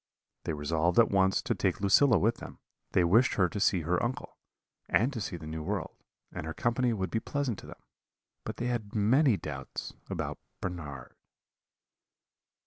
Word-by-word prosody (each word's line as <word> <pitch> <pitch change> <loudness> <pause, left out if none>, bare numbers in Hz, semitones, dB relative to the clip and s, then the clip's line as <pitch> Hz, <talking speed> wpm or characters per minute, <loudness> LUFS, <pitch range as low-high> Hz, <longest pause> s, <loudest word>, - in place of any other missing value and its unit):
They - - -1
resolved 80 +3 0
at 115 - +6
once 95 -1 +3
to - - 0
take - - 0
Lucilla 110 +5 +5
with 80 - +2
them; - - -10 0.4
they 90 - +4
wished 110 +10 +4
her 90 -3 +4
to 100 - -5
see 95 -3 +3
her 85 +3 0
uncle, 125 +1 -3 0.5
and 125 +6 +3
to 115 - -4
see 95 -2 -4
the 80 - -10
New 80 +1 -5
World, 75 - -3 0.4
and 75 - -6
her 80 - -5
company 120 +1 +1
would 95 -6 -2
be 115 - +1
pleasant 135 -5 -2
to - - -12
them; - - -12 0.6
but - - -5
they 120 - -3
had 115 -4 -3
many 115 +3 +4
doubts 70 -6 -6 0.2
about - - -3 0.2
Bernard. 75 -8 -6
100 Hz, 175 wpm, -30 LUFS, 85-120 Hz, 0.6 s, at